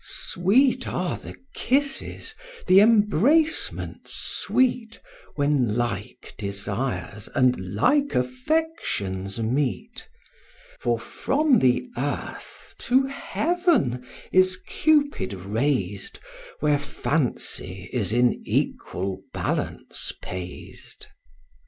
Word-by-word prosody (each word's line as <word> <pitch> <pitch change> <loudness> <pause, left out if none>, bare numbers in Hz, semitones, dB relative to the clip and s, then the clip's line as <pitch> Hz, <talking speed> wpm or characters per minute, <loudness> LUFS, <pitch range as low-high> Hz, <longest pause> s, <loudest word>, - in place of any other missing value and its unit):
(Sweet 250 +9 +2
are 180 0 -1
the - - -9 0.2
kisses, 280 - 0 0.3
the 185 +1 +7
embracements 230 - +2
sweet, 240 -3 0 0.4
When 140 -6 +1
like 120 0 -3
desires 100 0 -2
and 115 -7 +2
like 285 - +2
affections 125 - -1
meet; 140 - -2 0.7
For - - +1
from 285 -3 +1
the 130 - +2
earth - - -5
to 260 +2 +3
heaven 285 - 0 0.3
is 185 0 +4
Cupid 295 - +2
rais'd, 100 0 -1 0.4
Where 150 -1 +3
fancy 125 - -2
is 110 -6 +1
in 120 +1 +2
equal 95 +1 -2
balance - - -3
pais'd.) 90 -1 -8
145 Hz, 85 wpm, -25 LUFS, -, 0.7 s, the